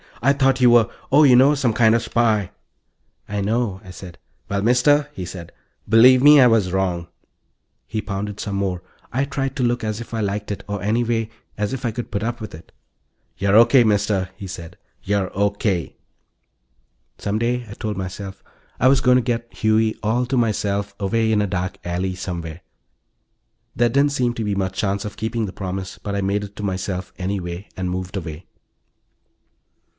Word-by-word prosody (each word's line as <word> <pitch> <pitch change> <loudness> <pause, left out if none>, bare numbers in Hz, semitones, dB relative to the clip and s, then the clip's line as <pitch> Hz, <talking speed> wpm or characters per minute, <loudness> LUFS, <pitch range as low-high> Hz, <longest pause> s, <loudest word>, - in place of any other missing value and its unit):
"I 140 +2 +5
thought 135 -1 +2
you 125 - +7
were... 120 -2 +6 0.2
oh, 145 +3 +6
you 130 -4 +7
know, 135 +4 +6
some 130 -5 +1
kid 110 0 +4
of - - +4
a - - +3
spy." 110 -5 +1 0.8
"I 105 0 -2
know," 105 -1 -1
I 95 - -13
said. 90 -1 -10 0.3
"Well, 100 0 -1
Mister," 140 +6 +3
he 90 - -6
said, 85 -1 -9 0.4
"believe 125 +3 +7
me, 145 0 +8
I 130 - +8
was 110 -6 +2
wrong." 90 -3 -1 0.8
He 110 - -3
pounded 105 0 -5
some 100 -2 -3
more. 95 -2 -2 0.3
I 135 +3 0
tried 135 -1 -3
to 130 - -1
look 120 -1 0
as 110 +1 -3
if 120 - -10
I 115 - -1
liked 105 +1 -2
it 100 - -5
or, 100 -2 -4
anyway, 115 +1 0 0.3
as 105 -1 -1
if 135 -1 -4
I 115 - 0
could 120 +2 -6
put 100 - -2
up 120 +2 -2
with 110 - -7
it. 80 - -15 0.7
"You're 100 +1 +2
O.K., 120 +3 +7
Mister," 100 -3 +1
he 100 0 -8
said. 85 -2 -9 0.3
"You're 100 -1 -1
O.K." 100 -3 0 1.2
Some 100 +1 -2
day, 120 +1 -1
I - - -7
told 105 -2 -4
myself, 95 +1 -6 0.4
I 125 - +4
was 135 0 +4
going 125 -1 +5
to - - +3
get 115 -1 -3
Huey 110 0 +1
all 115 +4 +1
to 130 - 0
myself, 100 -3 0
away 110 +3 +1
in 105 -1 +3
a - - -1
dark 90 -1 -3
alley 90 +2 -2
somewhere. 85 -3 -6 1.1
There 120 +1 +3
didn't 140 +4 +3
seem 125 -3 0
to 115 - -3
be 105 -1 -1
much 95 -1 -2
chance 100 -1 -1
of 105 - -7
keeping 110 0 -2
the 95 - -8
promise, 95 0 -5
but 100 -1 -4
I 100 - 0
made 100 +1 0
it 100 0 -9
to 105 - -6
myself 95 -1 -3
anyway, 90 0 -4
and 90 -1 -2
moved 90 +2 -4
away. 80 -1 -7
105 Hz, 190 wpm, -21 LUFS, 95-120 Hz, 1.2 s, me